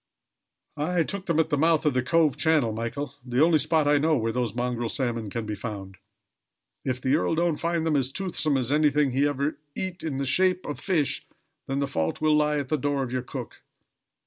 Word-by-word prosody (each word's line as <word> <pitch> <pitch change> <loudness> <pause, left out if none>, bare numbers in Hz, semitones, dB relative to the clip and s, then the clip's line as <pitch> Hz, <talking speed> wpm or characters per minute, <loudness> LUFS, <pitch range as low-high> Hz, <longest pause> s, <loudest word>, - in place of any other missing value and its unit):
"I 165 +3 +1
took 195 +2 -4
them 165 -2 +2
at 160 - +1
the 145 - +2
mouth 160 0 +3
of 150 - +3
the 130 - +2
Cove 155 +2 +2
channel, 155 -9 +2
Michael, 120 +5 -4
the 125 +3 +2
only 165 -2 +4
spot 155 +1 +2
I 145 0 +4
know 155 +1 +2
where 115 -1 0
those 120 -2 -2
mongrel 120 -1 -1
salmon 115 -5 -2
can 115 +2 -4
be 105 - -3
found. 100 -3 -6 0.9
If 130 -1 -1
the 130 +2 +2
earl 165 - +1
don't 170 -2 +1
find 170 -1 -1
them 160 -2 +1
as 135 -2 +1
toothsome 160 -5 0
as 130 0 -1
anything 150 -2 +3
he 140 +3 +2
ever 145 +1 -2 0.2
eat 185 -1 -4
in 150 -4 -3
the 140 - -1
shape 185 +6 +2
of 145 - -5
fish, 165 -8 -1 0.4
then 135 - -2
the 140 - +1
fault 80 - -2
will 155 0 +3
lie 150 0 +2
at 140 -3 -3
the 155 - +1
door 140 0 0
of 125 - -5
your 130 0 -1
cook." 125 - -8
145 Hz, 220 wpm, -26 LUFS, 125-160 Hz, 0.9 s, only